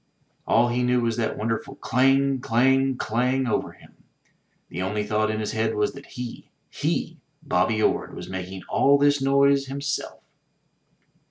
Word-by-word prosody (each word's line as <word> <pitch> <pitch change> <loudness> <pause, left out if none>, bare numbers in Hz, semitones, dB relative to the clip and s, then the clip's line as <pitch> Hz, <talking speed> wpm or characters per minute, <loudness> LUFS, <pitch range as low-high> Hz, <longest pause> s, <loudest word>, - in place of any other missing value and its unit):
All 120 +1 +3
he 120 +1 0
knew 125 0 +2
was 115 -1 0
that 115 -2 -1
wonderful 115 +1 -3
clang! 135 +2 +2
clang! 135 +3 +2
clang! 125 +4 0
over 120 - -1
him; - - -19 0.7
the 90 - -6
only 105 +3 -1
thought 110 0 0
in 110 0 -2
his 105 - -3
head 110 0 -1
was 105 0 0
that 140 +1 -12
he, 125 -1 -8 0.2
he, - - -2 0.2
Bobby 110 +5 +1
Orde, - - 0
was - - -8
making 95 0 -6
all 140 +1 +4
this 145 0 +3
noise 140 0 +3
himself! 140 +1 -4
125 Hz, 155 wpm, -24 LUFS, 110-135 Hz, 0.7 s, all